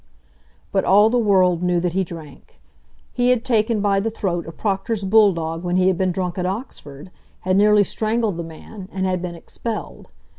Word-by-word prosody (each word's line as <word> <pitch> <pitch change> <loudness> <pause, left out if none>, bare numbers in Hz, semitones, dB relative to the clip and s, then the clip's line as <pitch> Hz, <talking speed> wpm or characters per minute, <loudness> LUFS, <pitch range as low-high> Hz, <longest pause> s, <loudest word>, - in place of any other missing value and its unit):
But 195 -1 +1
all 205 +3 +5
the 245 - +2
world 185 -5 +3
knew 180 -1 +1
that 175 -1 -2
he 190 +1 +1
drank. 160 -5 -12 0.5
He 245 0 +1
had 250 -1 +1
taken 225 -3 +1
by 200 -1 +2
the 220 +3 -1
throat 175 -6 -3
a - - -6
proctor's 200 +3 -2
bull 210 +1 +5
dog 165 -1 -4
when 175 0 0
he 185 0 +4
had 185 - 0
been 185 -1 +1
drunk 180 0 -3
at 180 - -1
Oxford, 185 - -7 0.3
had 185 0 0
nearly 210 +1 +5
strangled 220 -2 -1
the 170 - -4
man, 185 +4 -11
and 190 -1 -2
had 185 -1 -1
been 175 -1 -5
expelled. 220 +6 -7
190 Hz, 195 wpm, -21 LUFS, 175-215 Hz, 0.5 s, all